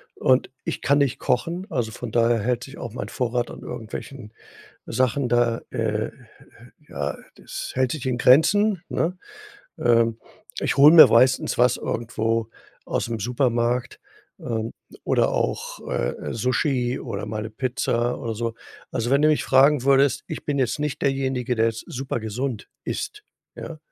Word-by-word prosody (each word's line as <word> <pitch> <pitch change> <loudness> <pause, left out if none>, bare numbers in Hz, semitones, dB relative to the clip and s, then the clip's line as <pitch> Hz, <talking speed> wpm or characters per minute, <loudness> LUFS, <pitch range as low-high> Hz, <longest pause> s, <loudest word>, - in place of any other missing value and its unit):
Und 130 0 +2
ich - - -3
kann 140 +1 +3
nicht 140 -4 +1
kochen, 170 +9 -1
also, 115 -3 -1
von - - -7
daher 115 0 +3
hält 120 +3 -1
sich 135 - -11
auch 120 -3 -7
mein - - -5
Vorrat 120 -1 -1
an - - -10
irgendwelchen 115 +1 -8 0.5
Sachen 130 0 0
da, 120 -1 +2
äh, - - -6 0.3
äh - - -11 0.8
ja, - - -4 0.2
das - - -7
hält 130 -1 +1
sich 150 -5 -5
in 130 -2 0
Grenzen, 185 - +4
ne? 180 +3 -1 0.6
Ähm, 115 -1 +3 0.4
ich - - 0
hole 145 +3 +8
mir 165 - +11
meistens 125 +3 +3
was 125 0 +4
irgendwo 115 -1 -2 0.4
aus'm 115 -2 -2
Supermarkt, 120 0 0 0.4
ähm, 115 -1 -3 0.3
oder - - +2
auch, - - -2
äh, - - -1 0.2
äh, - - -5
Sushi 125 +1 0
oder 105 -5 -5
mal 105 0 -4
'ne 110 - -6
Pizza 120 0 -1
oder 115 - -3
so. 115 +1 -3 0.4
Also, 120 +1 -2
wenn 140 +1 +4
du 155 - +5
mich 155 -1 +2
fragen 135 0 +4
würdest, 140 0 +3
ich - - -6
bin 145 -1 -1
jetzt 130 +2 0
nicht 150 -2 -3
derjenige, 130 -2 0
der 115 0 +2
jetzt 115 0 -4
supergesund 120 -2 -4 0.2
isst, 420 0 -4 0.3
ja? - - -8
125 Hz, 160 wpm, -23 LUFS, 115-135 Hz, 0.8 s, mir